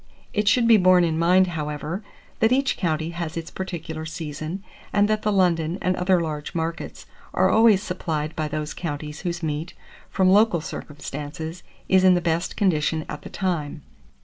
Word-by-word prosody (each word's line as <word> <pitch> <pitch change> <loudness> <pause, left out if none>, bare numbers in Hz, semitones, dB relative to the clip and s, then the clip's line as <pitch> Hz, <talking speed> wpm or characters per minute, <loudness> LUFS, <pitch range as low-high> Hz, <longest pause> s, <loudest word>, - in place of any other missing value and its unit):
It 210 -3 0
should 230 +3 +4
be 230 -2 +7
borne 185 -2 +5
in 160 -1 0
mind, 180 +3 +5
however, 155 +2 -4 0.4
that 225 +1 +3
each 270 +2 +2
county 160 -2 -1
has 170 -1 -5
its 165 0 -5
particular 165 -4 -5
season, 160 +3 -5 0.3
and 205 0 +3
that 215 0 0
the 210 - +1
London 175 -3 +2
and 185 0 0
other 180 0 +2
large 155 0 -4
markets 165 0 -4 0.3
are - - +4
always 220 -3 +5
supplied 160 -5 -3
by 155 -1 -1
those 150 0 -4
counties 150 -2 -5
whose 175 -2 -3
meat, 155 +2 -3 0.3
from 190 - +2
local 205 -3 +5
circumstances, 150 +2 -6 0.3
is 190 0 +4
in 185 -1 +6
the - - +2
best 170 +1 -1
condition 160 -5 +1
at 150 - -6
the - - -9
time. 160 -5 -3
170 Hz, 175 wpm, -24 LUFS, 155-190 Hz, 0.4 s, be